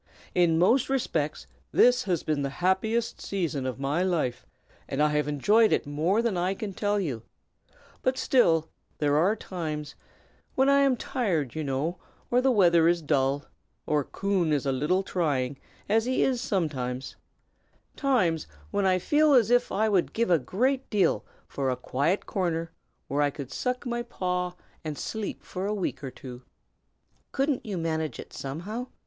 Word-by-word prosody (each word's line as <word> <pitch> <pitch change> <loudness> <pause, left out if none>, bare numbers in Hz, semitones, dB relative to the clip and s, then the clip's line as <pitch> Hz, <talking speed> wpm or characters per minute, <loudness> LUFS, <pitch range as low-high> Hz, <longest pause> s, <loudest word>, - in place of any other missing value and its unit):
In 170 -2 +3
most 230 +11 +3
respects 270 -2 -1 0.3
this 250 +1 +4
has 180 -5 0
been 150 -2 0
the 140 - -1 0.2
happiest 220 +5 +1
season 165 -9 -2
of 130 0 -4
my 140 +5 0
life, 170 -10 -1 0.4
and 135 - -3
I 150 0 +4
have 150 -1 0
enjoyed 210 - +4
it - - +1
more 165 +10 +1
than 230 -5 0
I 180 +2 0
can 205 -2 -5
tell 205 +1 0
you; 140 - -3 0.8
but 260 0 +1
still 165 - +3 0.3
there 145 -1 +1
are 180 +8 +3
times, 155 -7 -5 0.6
when 265 +1 +4
I 280 0 +5
am 275 -3 +3
tired, 180 - -1
you 155 - -3
know, 145 +5 -2 0.3
or 245 +1 +4
the 265 - +3
weather 170 -8 +5
is 170 -1 +2
dull, 140 0 +1 0.4
or 150 -1 +1
Coon 190 0 -1
is 145 -3 +1
a 135 - +1
little 150 +9 +1
trying, 145 -8 -1 0.3
as 220 +2 +2
he 255 +1 +1
is 255 -3 +1
sometimes, 135 - -2 0.8
times 210 - +1 0.2
when 200 -1 +1
I 185 -1 +4
feel 295 - +3
as 240 -2 +4
if 245 0 +3
I 215 +2 +2
would 195 -5 +1
give 230 -4 +1
a 170 - +5
great 255 - 0
deal 195 -6 +2 0.2
for 135 -2 -2
a 130 - 0
quiet 140 +9 0
corner 165 -3 -2 0.4
where 145 +2 0
I 145 - +3
could 140 -2 -8
suck 250 - -2
my 240 -1 -2
paw 180 -6 -2 0.3
and 155 -2 -4
sleep 220 -2 -4
for 190 +1 -4
a 210 - -1
week 185 -6 -3
or 135 - -3
two." 125 -1 -10 0.9
"Couldn't 275 -1 0
you 205 -4 -4
manage 160 -2 -2
it, - - -10
somehow?" 190 - -5
180 Hz, 170 wpm, -27 LUFS, 150-220 Hz, 0.9 s, I